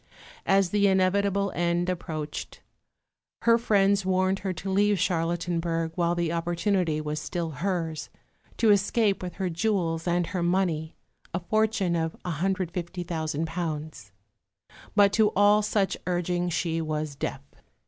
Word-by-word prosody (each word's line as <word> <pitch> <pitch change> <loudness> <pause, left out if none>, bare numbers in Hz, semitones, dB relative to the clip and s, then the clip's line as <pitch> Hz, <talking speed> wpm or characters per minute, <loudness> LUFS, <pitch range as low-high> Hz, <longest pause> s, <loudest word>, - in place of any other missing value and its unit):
As 195 -2 +3
the 205 -1 +3
inevitable 200 +1 +2
end 175 0 0
approached, 160 -4 -4 0.8
her 230 0 +5
friends 200 -3 +3
warned 185 +1 +1
her 190 -1 -2
to 185 +2 -5
leave 205 +1 +3
Charlottenburg 170 -1 -1
while 170 0 +1
the 170 -1 0
opportunity 170 -1 0
was 150 0 -3
still 165 +2 -3
hers 165 0 -3 0.5
to 225 -2 +4
escape 205 +1 +2
with 180 -2 -6
her 190 - -2
jewels 170 -2 -1
and 175 0 +2
her 180 +1 -3
money 170 -3 0 0.4
(a - - 0
fortune 215 -1 +1
of 160 -1 -1
£150,000) 165 - -3 0.8
but 200 -1 +5
to 215 -1 +4
all 205 +1 +5
such 205 -2 0
urging 175 0 0
she 165 -1 -1
was 155 -1 -3
deaf. 135 -1 -4
175 Hz, 130 wpm, -27 LUFS, 165-195 Hz, 0.8 s, her